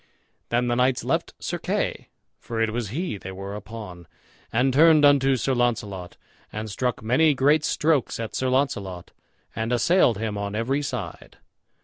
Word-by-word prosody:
Then 120 +1 +1
the 120 - +1
knights 125 +1 +2
left - - -1
Sir - - -4
Kay, - - -2 0.3
for 115 -1 -5
it 110 -1 +1
was 115 -2 -3
he 140 - -3
they 95 - -7
were 95 +1 -7
upon, 105 -5 -9 0.4
and 125 +3 +2
turned 155 +1 +6
unto 135 -2 +5
Sir 130 +2 0
Launcelot, 105 -7 -2 0.3
and 110 0 -5
struck 125 +2 -2
many 140 +7 +3
great 145 +4 +3
strokes 150 -7 +1
at 115 -1 -5
Sir 130 - -1
Launcelot, 100 -10 -1 0.4
and 110 +1 -2
assailed 125 - +3
him 105 -1 -3
on 100 0 -4
every 130 +6 0
side. 120 - -6
120 Hz, 160 wpm, -24 LUFS, 105-135 Hz, 0.4 s, turned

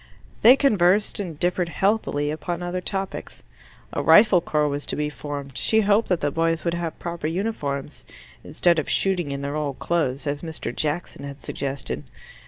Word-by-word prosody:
They 245 +4 +9
conversed 205 -8 +3
and 170 -7 -5
differed 175 0 0
healthily 170 -7 0
upon 170 +3 -4
other 180 +1 -3
topics. 195 +1 -4 0.5
A - - -1
rifle 210 -4 +6
corps 150 -3 +1
was 145 0 -2
to - - -1
be 150 0 -1
formed: 145 -3 -6
she 220 - +3
hoped 210 +2 +2
that 180 -4 +1
the 145 - 0
boys 165 +1 0
would 170 - 0
have 170 -2 -3
proper 170 -2 -4
uniforms, 155 -7 -3 0.4
instead 170 -2 +2
of 155 - -4
shooting 180 -6 +1
in 140 0 -4
their 140 +1 -3
old 145 -3 -2
clothes, 150 -6 -1
as 145 0 -2
Mr. 160 -7 -5
Jackson 150 -2 -3
had 140 0 -7
suggested. 135 -1 -4
165 Hz, 175 wpm, -24 LUFS, 145-185 Hz, 0.5 s, They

